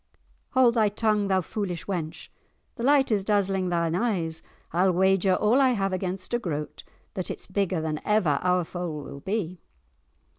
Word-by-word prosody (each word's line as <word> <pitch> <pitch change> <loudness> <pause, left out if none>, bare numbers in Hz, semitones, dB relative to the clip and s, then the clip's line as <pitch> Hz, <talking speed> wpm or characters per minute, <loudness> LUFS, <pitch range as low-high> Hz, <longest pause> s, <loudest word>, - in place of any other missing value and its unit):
"Hold 255 -3 +5
thy 220 -3 +3
tongue, 210 -1 +1
thou 190 -1 +2
foolish 180 -2 -4
wench, 170 -4 -4 0.4
the 235 - -9
light 270 0 +4
is 205 -3 +2
dazzling 195 -2 +1
thine 170 -2 0
eyes. 175 -6 -1 0.3
I'll 185 +2 +3
wager 190 +1 +3
all 225 +8 +3
I 260 -2 +4
have 195 -3 -1
against 185 +2 -3
a 240 - +2
groat 150 -8 -5 0.3
that 185 - -4
it's - - -6
bigger 190 -2 -1
than 155 -1 -3
ever 185 -10 +2
our 180 0 +2
foal 165 -4 -5
will 140 0 -9
be." 185 -1 -3
190 Hz, 170 wpm, -26 LUFS, 175-210 Hz, 0.4 s, Hold